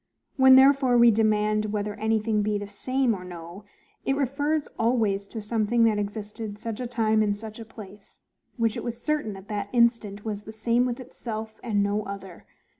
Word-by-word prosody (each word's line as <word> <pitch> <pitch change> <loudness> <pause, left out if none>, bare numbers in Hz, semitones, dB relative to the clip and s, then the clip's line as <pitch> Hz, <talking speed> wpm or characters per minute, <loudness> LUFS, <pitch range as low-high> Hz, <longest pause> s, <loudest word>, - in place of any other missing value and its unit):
When 265 -1 +7
therefore 265 -2 +5
we 235 0 +7
demand 215 -1 +2
whether 210 0 -2
anything 220 0 0
be 210 0 0
the 205 - -5
SAME 255 +5 0
or 185 -3 -6
no, 175 +2 -10 0.4
it 270 - +1
refers 285 +3 0
always 220 -4 +1
to 225 - -6
something 225 +2 +1
that 220 -2 +3
existed 210 +1 -5
such 225 0 -5
a 250 - -3
time 220 -2 +1
in 205 -1 +1
such 215 +1 -9
a 225 - -8
place, 205 -2 -13 0.3
which 230 -2 +1
it - - -5
was 235 -1 -4
certain, 240 -7 -2
at 190 +1 -13
that 205 -1 -3
instant, 230 -4 +1
was 210 -2 -3
the 215 - -10
same 235 +3 +1
with 245 0 -3
itself, 220 -3 -7
and 210 -4 0
no 205 +1 0
other. 195 -3 -9
220 Hz, 190 wpm, -26 LUFS, 205-235 Hz, 0.4 s, When